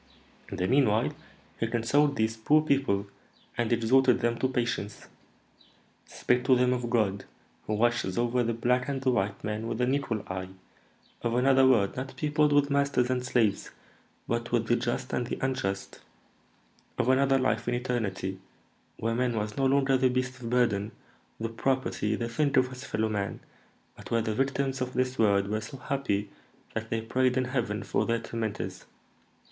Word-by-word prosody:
In 100 - -6
the 90 - 0
meanwhile, 125 -4 +3 0.5
he 115 - 0
consoled 140 +6 +2
these 110 -2 0
poor 150 +7 +3
people, 135 -10 +1 0.5
and 120 -1 -1
exhorted 125 +2 +4
them 120 -1 +1
to 130 - +2
patience; 120 -5 -3 1.0
spake 125 0 0
to 130 - +5
them 125 0 +3
of 120 -1 -3
God, 105 -5 0 0.4
who 105 - 0
watches 120 -4 +1
over 120 +1 +1
the 115 -1 0
black 125 +3 +1
and 135 -1 -1
the 130 - +3
white 100 -3 -1
man 105 +1 -3
with 115 0 -3
an 125 +2 +2
equal 130 -7 -1
eye; 95 0 -5 0.7
of 120 0 -1
another 135 +1 +5
world 110 -7 +3
not 130 +1 -5
peopled 150 0 +2
with 145 0 +3
masters 140 -3 +2
and 125 -1 0
slaves, 115 -5 +1 0.6
but 115 0 -2
with 120 -1 +1
the 120 - +3
just 120 +2 -2
and 120 - -1
the - - -3
unjust; 100 -8 -2 1.0
of 125 - 0
another 135 +1 +4
life 130 -2 0
in 120 - +1
eternity, 105 -7 -2 0.6
where 115 +1 -1
man 120 0 0
was 105 0 -3
no 135 -1 +2
longer 135 0 +3
the 130 0 +4
beast 130 +1 -2
of 115 - -5
burden, 115 -4 +1 0.5
the 115 - -1
property, 115 -2 -1
the 115 +1 -3
thing 140 +4 0
of 130 -1 +4
his 130 +1 -9
fellow 110 -3 -1
man, 105 -2 -3 0.6
but - - -12
where 115 -1 +1
the 110 -1 -1
victims 135 +2 -1
of 125 0 -2
this 130 +1 -1
world 100 -3 +3
were 110 +1 -1
so 115 +5 -8
happy 115 -7 -2 0.4
that 110 0 -4
they 115 - -1
prayed 125 +3 +1
in 130 - +1
heaven 120 -5 -2
for - - 0
their 115 0 +2
tormentors. 110 -5 -4
120 Hz, 175 wpm, -28 LUFS, 110-130 Hz, 1.0 s, to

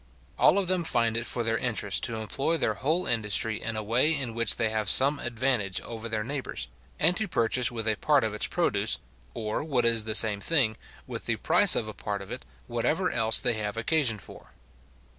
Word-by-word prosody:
All - - +5
of 195 -2 0
them 185 -1 0
find 115 -7 0
it 120 +1 -2
for 120 - -3
their 115 0 -1
interest 110 -5 -2
to 115 - -4
employ 125 - -2
their - - 0
whole 160 +6 -1
industry 110 -1 0
in 115 0 -4
a 110 - -3
way 120 +8 +2
in 130 -5 -3
which 115 +1 0
they 115 -1 0
have 110 -2 -2
some 140 +5 +5
advantage 120 -5 -1
over 115 0 -8
their 110 -1 -2
neighbours, 135 +3 -5 0.3
and 170 +4 +4
to 220 - -2
purchase 120 -5 0
with 115 -2 -4
a 110 - +2
part 145 -4 +2
of 110 -2 -2
its 105 - -1
produce, 60 - -1 0.4
or, 110 +5 -3
what 135 -6 0
is 115 -2 +3
the 110 -1 0
same 105 -2 +7
thing, 130 -8 +2 0.3
with - - -8
the - - +1
price - - +4
of 110 - 0
a 110 - -6
part 100 -2 -5
of 95 - -13
it, 125 - -8 0.2
whatever 140 +10 -1
else 110 -1 +4
they 120 - 0
have 105 0 -4
occasion 120 -1 0
for. 95 - -14
115 Hz, 215 wpm, -27 LUFS, 110-135 Hz, 0.4 s, same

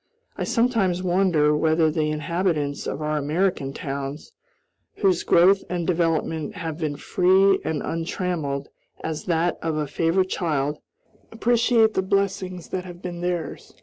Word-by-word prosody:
I - - -3
sometimes 225 -7 +1
wonder 175 -5 +3
whether 160 +1 +2
the 155 0 0
inhabitants 155 -2 -1
of 150 - -4
our 150 0 0
American 150 -1 0
towns, 140 - -5 0.6
whose 190 -4 +2
growth 190 +3 +4
and 175 -2 -2
development 165 +1 0
have 165 -4 -5
been 155 -3 -2
free 190 +5 +3
and 155 -2 -2
untrammeled 165 -4 -3 0.3
as 160 -1 -4
that 170 0 0
of 160 -1 -1
a 150 - 0
favorite 165 +6 +1
child, 150 -5 -1 0.5
appreciate 230 -1 +3
the - - +1
blessings 190 -2 -1
that 185 - -3
have 175 0 -11
been 175 -1 -5
theirs. 175 -3 -4
170 Hz, 140 wpm, -24 LUFS, 155-185 Hz, 0.6 s, growth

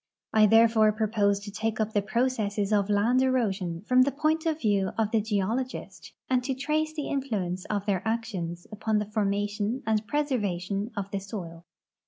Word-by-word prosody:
I 215 -1 +6
therefore 225 0 +5
propose 210 -2 +1
to 205 0 -8
take 220 +2 -2
up 220 0 -1
the 205 - +2
processes 215 -3 0
of 200 -1 +2
land 220 +5 +3
erosion 200 -10 0
from 255 +3 +4
the 275 +2 +3
point 315 +3 0
of 315 -1 0
view 200 -6 +1
of 220 -2 +1
the 225 - +2
geologist, 220 +5 -3
and 255 -1 +1
to 265 0 -2
tz'ace 310 +3 -1
the 300 - -3
influence 200 -10 -2
of 205 -1 -2
their 195 -4 0
actions 195 -7 -3
upon 215 0 -1
the 210 - 0
formation 205 +3 -1
and 220 -1 +1
izreservation 205 -8 -1
of 200 0 -4
the 200 - -1
soil. 175 -4 -8
215 Hz, 175 wpm, -27 LUFS, 200-250 Hz, -, I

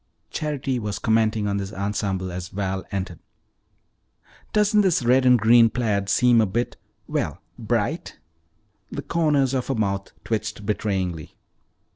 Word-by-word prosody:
Charity 140 -4 -2
was 105 -2 -3
commenting 110 -1 +1
upon 100 -1 0
this 100 0 -4
ensemble 100 -2 -2
as 90 0 -6
Val 95 -1 -3
entered. 95 -4 -4 1.3
"Doesn't 210 0 +4
this 185 -9 +2
red 130 +2 +4
and 125 0 +7
green 115 +1 +6
plaid 105 -4 -1
seem 120 +2 +5
a 110 - +2
bit 120 +6 -2 0.3
well, - - -2 0.2
bright?" - - -2 0.7
The - - -5
corners 150 -5 +1
of 130 -2 -1
her 135 - 0
mouth 100 -3 -1
twitched 110 -1 -3
betrayingly. 95 -6 -2
110 Hz, 135 wpm, -24 LUFS, 100-125 Hz, 1.3 s, and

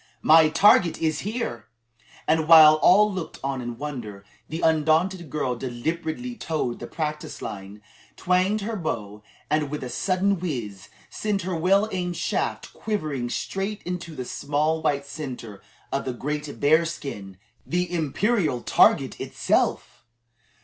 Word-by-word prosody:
"My 155 0 +7
target 175 -1 +4
is 155 -2 0
here!" 205 - -4 0.6
and 160 -1 +2
while 155 -2 +9
all 210 +3 +5
looked 185 -3 -5
on 135 -1 -2
in 120 -1 -6
wonder, 120 -9 -7 0.2
the 160 +2 -4
undaunted 160 +2 +2
girl 130 -4 -1
deliberately 160 - -4
toed 155 - -3
the 120 - -7
practice 150 -1 -4
line, 100 +1 -8 0.3
twanged 185 +4 +1
her 225 +2 -3
bow, 105 - -4 0.3
and 150 -1 0
with 150 -1 -5
a 125 - -5
sudden 195 0 0
whiz, 105 - -5 0.2
sent 205 -3 -2
her 185 0 -2
well 195 +5 +3
aimed 180 -2 -3
shaft - - -2
quivering 155 - -3
straight 195 - -3
into 170 -2 -5
the 125 - -5
small 150 +5 -1
white 140 -3 0
centre 130 -8 -7 0.3
of 135 - -2
the 130 - -2
great 150 +3 -5
bearskin 145 - 0 0.3
the 180 +1 -2
imperial 165 - 0
target - - +3
itself! - - -1
155 Hz, 135 wpm, -24 LUFS, 130-180 Hz, 0.6 s, while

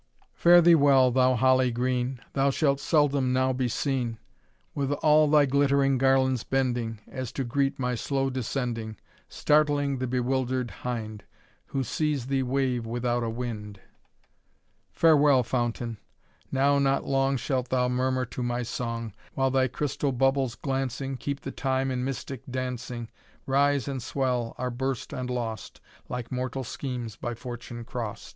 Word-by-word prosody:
"Fare 175 0 +6
thee 170 +1 +7
well, 140 -4 +5
thou 130 0 +3
Holly 130 +1 +4
green, 125 +1 -1
Thou 140 0 +2
shall 140 0 +2
seldom 140 -3 +2
now 130 0 +2
be 130 0 0
seen, 120 -2 -1 0.6
With 140 -1 -1
all 155 +1 +4
thy 150 -1 +5
glittering 140 -1 +2
garlands 130 -2 +3
bending, 120 -4 -1
As 130 -3 -5
to 135 - -2
greet 135 +3 0
my 125 -1 -1
slow 135 +2 -1
descending, 120 -3 -3 0.3
Startling 145 -2 +2
the 130 - -1
bewilder'd 125 0 -1
hind. 110 -4 -5 0.4
Who 135 - -2
sees 145 0 -1
thee 135 0 0
wave 130 -2 0
without 120 +1 -1
a 115 - -1
wind. 110 -4 -5 1.1
"Farewell, 145 -5 +5
Fountain! 120 -2 -2 0.5
now 140 +1 +3
not 135 0 +1
long 135 0 +1
Shalt 130 0 -2
thou 125 -1 +2
murmur 130 +1 0
to 125 - -7
my 120 0 -1
song, 115 -2 -4 0.2
While 135 -1 +1
thy 130 0 +3
crystal 140 +2 -2
bubbles 135 -1 +1
glancing, 135 -1 -3
Keep 140 +2 -4
the - - -5
time 135 -1 -1
in 125 -1 -2
mystic 135 0 -4
dancing, 125 -2 -4 0.4
Rise 140 -1 +2
and 135 -2 -3
swell, 125 -2 -1
are 125 0 -2
burst 130 +1 -3
and 125 -1 -4
lost, 115 -3 -4 0.3
Like 125 -2 -5
mortal 130 +1 -3
schemes 120 -3 -5
by 120 0 -4
fortune 120 -1 -7
crost. 115 -4 -5
130 Hz, 150 wpm, -27 LUFS, 120-135 Hz, 1.1 s, thee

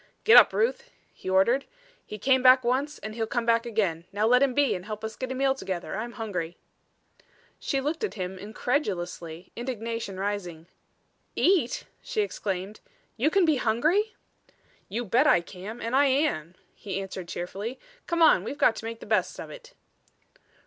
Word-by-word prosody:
"Get 445 - +7
up, - - +9
Ruth," 480 +2 0 0.2
he - - -7
ordered. 215 +9 +3 0.4
"He 210 - -8
came 260 +5 +3
back 255 0 +7
once 265 +5 0
and 215 - -7
he'll 225 0 -2
come 240 -1 -1
back 230 0 +2
again. 190 -8 -1
Now 205 +2 0
let 250 +3 +5
him 270 -3 +2
be 285 -1 +3
and 180 0 -5
help 215 0 -6
us 220 0 -5
get 260 0 -5
a - - -3
meal 270 +1 +2
together. 190 -10 -5
I'm 235 +3 -4
hungry." 180 -8 -4 1.0
She 275 - -1
looked 300 +8 -2
up - - +3
at - - -13
him, 185 -1 -5
incredulously, 185 - -3
indignation 230 -5 -4
rising. 185 -5 -4 0.7
"Eat!" 340 -10 +2 0.2
she 430 - -1
exclaimed. 200 - -4 0.4
"You 275 +7 +2
can 385 +1 +3
be 310 -3 +3
hungry?" 310 - +1 0.7
"You 235 +5 -3
bet 230 +5 +3
I - - +6
can 190 +6 -9
and 230 +3 -2
I 285 +1 +5
am," 260 - 0 0.2
he 195 -2 -5
answered 190 -2 -6
cheerfully. 195 +8 -5 0.3
"Come 340 -1 +2
on; - - +6
we've 285 - -5
got 225 - +4
to - - -7
make 230 0 -6
the - - -8
best - - 0
of - - -7
it." - - -13
230 Hz, 180 wpm, -27 LUFS, 195-270 Hz, 1.0 s, up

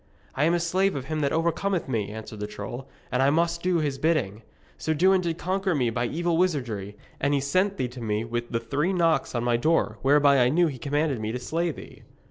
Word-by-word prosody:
'I 135 +3 +1
am 165 - +3
the 175 - +2
slave 185 +3 +1
of 135 -2 -4
him 155 +1 -3
that 140 -2 +1
overcometh 170 +3 0
me,' 110 -6 -1
answered 110 0 -8
the 105 - -3
troll, 105 +5 -7 0.2
'and 125 - +1
I 135 - +4
must 170 +2 +1
do 180 -1 +1
his 145 -4 -1
bidding. 135 -11 0 0.4
Sir 160 0 -1
Dewin 185 +4 +4
did 170 -2 -2
conquer 190 0 -1
me 125 -5 +1
by 120 +1 -1
evil 170 +3 0
wizardry, 120 - -1 0.2
and 140 +1 +1
he - - +2
sent 185 +8 +1
thee 130 - -1
to 125 0 -10
me 110 0 -1
with 120 +1 -3
the 115 - 0
three 145 +11 -1
knocks 165 -7 +1
on 120 - 0
my 120 -1 +2
door, 160 +7 +1
whereby 140 0 +5
I 125 0 +4
knew 175 +6 +3
he 140 -6 -3
commanded 145 -2 0
me 110 0 -3
to 125 - -3
slay 165 +7 -1
thee.' 155 - -9
145 Hz, 235 wpm, -26 LUFS, 120-170 Hz, 0.4 s, whereby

